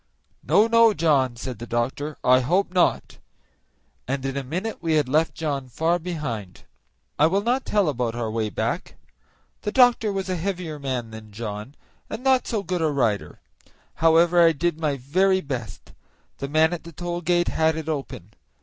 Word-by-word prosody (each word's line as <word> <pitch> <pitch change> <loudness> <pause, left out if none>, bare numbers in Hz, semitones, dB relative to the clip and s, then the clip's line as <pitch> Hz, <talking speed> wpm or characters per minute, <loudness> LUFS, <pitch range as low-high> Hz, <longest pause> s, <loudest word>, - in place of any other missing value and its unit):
"No, 210 - +4
no, 230 -1 +5
John," 135 -7 +2
said 120 -1 -6
the 120 - -7
doctor, 135 +6 -2
"I 130 0 +5
hope 180 +9 0
not," 180 -2 +1 0.9
and 135 +1 -2
in 135 0 -2
a 140 - -2
minute 180 - -4
we 165 -2 0
had 150 -3 +2
left 155 +4 +1
John 145 -6 -3
far 165 +7 0
behind. 135 - -5 0.6
I 150 - +6
will 195 +4 0
not 250 +3 0
tell 205 -4 +2
about 125 -5 -1
our 115 -2 -3
way 110 -1 -1
back. - - -3 0.7
The 210 - -3
doctor 245 -4 +4
was 195 -1 -3
a 185 -1 -2
heavier 170 -4 -4
man 130 -5 -3
than 110 -1 -11
John, 105 +4 -6 0.3
and 220 +3 -6
not 265 -1 +3
so 215 -4 -2
good 180 -3 -2
a 160 - +2
rider; 120 -8 -1 0.5
however, 165 +2 +4
I 165 -1 +5
did 165 +1 -1
my 150 -3 0
very 185 +9 +2
best. 125 - -6 0.5
The 140 - -4
man 160 +3 +3
at 175 - -5
the 170 - -10
toll 175 +1 -4
gate 175 0 +1
had 160 0 +1
it 160 -1 -5
open. 135 - -5
155 Hz, 180 wpm, -24 LUFS, 130-180 Hz, 0.9 s, I